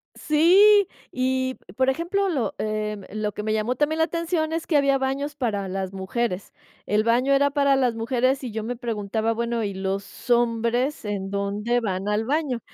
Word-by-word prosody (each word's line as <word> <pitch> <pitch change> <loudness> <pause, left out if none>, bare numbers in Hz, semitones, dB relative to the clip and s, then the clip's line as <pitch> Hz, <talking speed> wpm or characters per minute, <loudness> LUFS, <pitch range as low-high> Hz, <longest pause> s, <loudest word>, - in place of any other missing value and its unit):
Sí, 380 +6 +5 0.2
y, 260 0 0
p 180 - -18
por 260 +3 +2
ejemplo, 355 +7 0
lo, 255 - -1
eh, 215 0 -2 0.2
lo 215 -1 -2
que 210 - -5
me 215 - 0
llamó 220 +3 0
también 305 +4 0
la 320 - +4
atención 335 -1 -1
es 330 0 -2
que 320 - 0
había 275 -1 +4
baños 275 +2 -2
para 210 -8 -2
las 190 0 -4
mujeres. 190 0 -3 0.4
El 210 +1 +2
baño 245 +4 +2
era 280 +1 +3
para 280 -1 +3
las 250 -3 +1
mujeres 255 +3 0
y 245 - -4
yo 220 0 -4
me 245 +3 -3
preguntaba, 225 -2 -2
bueno, 235 0 -1
¿y 200 -2 -2
los 195 +5 -5
hombres 235 +2 +1
en 195 -2 -3
dónde 205 +4 -1
van 195 -3 -3
al 210 +2 0
baño? 285 -2 0
240 Hz, 190 wpm, -24 LUFS, 210-280 Hz, 0.4 s, Sí